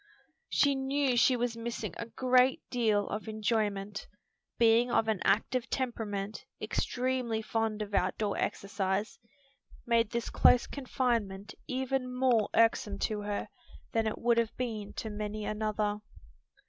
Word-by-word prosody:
She 285 Hz, -1 st, +3 dB
knew 270 Hz, -1 st, +1 dB
she 250 Hz, +2 st, +5 dB
was 240 Hz, -1 st, -1 dB
missing 230 Hz, -4 st, -4 dB
a 230 Hz, -, -5 dB
great 255 Hz, +2 st, +3 dB
deal 220 Hz, -5 st, +2 dB
of 210 Hz, +2 st, -4 dB
enjoyment. 210 Hz, -2 st, -1 dB, 0.5 s
Being 230 Hz, +1 st, +5 dB
of 225 Hz, -, +2 dB
an 220 Hz, -3 st, +1 dB
active 250 Hz, +3 st, +1 dB
temperament, 215 Hz, -5 st, -3 dB, 0.2 s
extremely 250 Hz, -3 st, -1 dB
fond 220 Hz, -1 st, -1 dB
of 205 Hz, -1 st, -10 dB
out 185 Hz, -1 st, +1 dB
door 210 Hz, -2 st, -1 dB
exercise, 200 Hz, +1 st, -2 dB, 0.7 s
made 230 Hz, -2 st, +3 dB
this 235 Hz, 0 st, -3 dB
close 245 Hz, -, +5 dB
confinement 230 Hz, -7 st, -2 dB
even 260 Hz, 0 st, -1 dB
more 250 Hz, -4 st, +2 dB
irksome 225 Hz, -3 st, +3 dB, 0.2 s
to 210 Hz, -, -3 dB
her 205 Hz, 0 st, -3 dB, 0.4 s
than 225 Hz, -1 st, +1 dB
it 215 Hz, -, -2 dB
would 235 Hz, 0 st, +3 dB
have 230 Hz, -1 st, -1 dB
been 220 Hz, -5 st, -3 dB
to 220 Hz, -, -5 dB
many 210 Hz, 0 st, -4 dB
another. 210 Hz, -1 st, -1 dB
225 Hz, 135 wpm, -31 LUFS, 210-245 Hz, 0.7 s, she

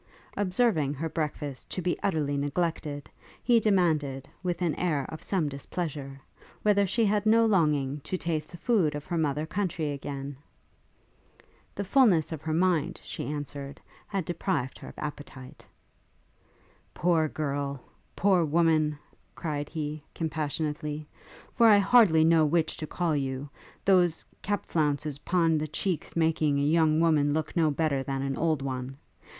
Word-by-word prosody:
Observing 185 Hz, -, +1 dB
her 160 Hz, +4 st, -3 dB
breakfast 150 Hz, -4 st, -4 dB
to -, -, -3 dB
be 180 Hz, -1 st, 0 dB
utterly 155 Hz, -7 st, 0 dB
neglected, 145 Hz, 0 st, -2 dB, 0.4 s
he 235 Hz, -1 st, +5 dB
demanded, 155 Hz, -10 st, +1 dB
with 180 Hz, -1 st, -2 dB
an 165 Hz, -3 st, +1 dB
air 150 Hz, -5 st, -1 dB
of 155 Hz, -, -8 dB
some 180 Hz, -6 st, 0 dB
displeasure, 140 Hz, -1 st, -5 dB, 0.4 s
whether 200 Hz, -1 st, +3 dB
she 225 Hz, +5 st, +1 dB
had 205 Hz, 0 st, +2 dB
no 230 Hz, +1 st, +5 dB
longing 150 Hz, -9 st, +2 dB
to 185 Hz, +6 st, -4 dB
taste 160 Hz, -3 st, -2 dB
the 175 Hz, -, -10 dB
food 180 Hz, -9 st, +1 dB
of 145 Hz, 0 st, -6 dB
her 175 Hz, -, -3 dB
mother 150 Hz, 0 st, 0 dB
country 170 Hz, -4 st, -2 dB
again? 140 Hz, 0 st, -5 dB, 1.4 s
The 200 Hz, -, -2 dB
fulness 195 Hz, -, +4 dB
of 160 Hz, -3 st, -5 dB
her 155 Hz, 0 st, -2 dB
mind, 170 Hz, -1 st, +1 dB
she 155 Hz, -, -6 dB
answered, 140 Hz, -1 st, -6 dB, 0.3 s
had 195 Hz, -4 st, -2 dB
deprived 170 Hz, -6 st, -2 dB
her -, -, -10 dB
of -, -, -12 dB
appetite. 145 Hz, -3 st, -8 dB, 1.3 s
'Poor 165 Hz, -2 st, +2 dB
girl! 140 Hz, -2 st, -3 dB, 0.4 s
poor 190 Hz, -3 st, +3 dB
woman!' 155 Hz, -1 st, +2 dB, 0.4 s
cried 150 Hz, -3 st, -3 dB
he, 150 Hz, -2 st, -4 dB
compassionately, 150 Hz, -1 st, -3 dB, 0.5 s
'for 235 Hz, -2 st, +5 dB
I 210 Hz, -2 st, +8 dB
hardly 200 Hz, -6 st, +5 dB
know 165 Hz, -1 st, +5 dB
which 160 Hz, +1 st, +1 dB
to 155 Hz, -, -5 dB
call 170 Hz, -2 st, -1 dB
you, 135 Hz, 0 st, -2 dB, 0.4 s
those 180 Hz, -4 st, +3 dB, 0.2 s
cap 205 Hz, 0 st, -2 dB
flounces 150 Hz, -2 st, -1 dB
pon 165 Hz, -2 st, +2 dB
the 155 Hz, -, -2 dB
cheeks 160 Hz, +3 st, -3 dB
making 160 Hz, -3 st, +2 dB
a 140 Hz, -, +1 dB
young 155 Hz, +1 st, +3 dB
woman 150 Hz, -3 st, +3 dB
look 155 Hz, +2 st, -2 dB
no 165 Hz, -3 st, +3 dB
better 145 Hz, -2 st, 0 dB
than 135 Hz, 0 st, -3 dB
an 135 Hz, 0 st, -2 dB
old 155 Hz, -3 st, 0 dB
one. 130 Hz, 0 st, -4 dB
155 Hz, 150 wpm, -28 LUFS, 145-175 Hz, 1.4 s, I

